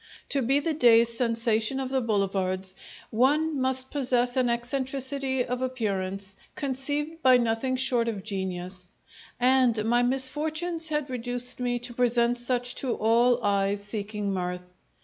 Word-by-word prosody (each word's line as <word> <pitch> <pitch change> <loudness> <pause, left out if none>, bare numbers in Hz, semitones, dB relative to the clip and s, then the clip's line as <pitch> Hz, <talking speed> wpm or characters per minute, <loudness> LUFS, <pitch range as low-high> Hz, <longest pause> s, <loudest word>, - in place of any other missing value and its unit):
To 280 - +1
be 265 +3 +2
the 320 +2 -1
day's 235 -5 +5
sensation 230 +1 0
of 265 -1 -3
the 265 0 0
boulevards 190 -4 -1 0.4
one 285 +5 +2
must 260 0 0
possess 250 -3 +1
an 255 -2 +2
eccentricity 265 +1 -2
of 250 +1 -3
appearance 200 -6 -3 0.2
conceived 290 +4 -3
by 255 -2 +6
nothing 235 +2 0
short 250 -2 +1
of 210 -4 -3
genius; 185 -3 -4 0.5
and 250 -3 +3
my 240 +2 +3
misfortunes 310 +6 -1
had 300 -2 -1
reduced 245 +1 -3
me 245 -1 0
to 240 0 -5
present 240 0 +2
such 245 0 -1
to 255 -3 -1
all 235 +2 +3
eyes 200 0 +1
seeking 205 -1 -3
mirth. 180 -1 -4
245 Hz, 140 wpm, -27 LUFS, 215-265 Hz, 0.5 s, by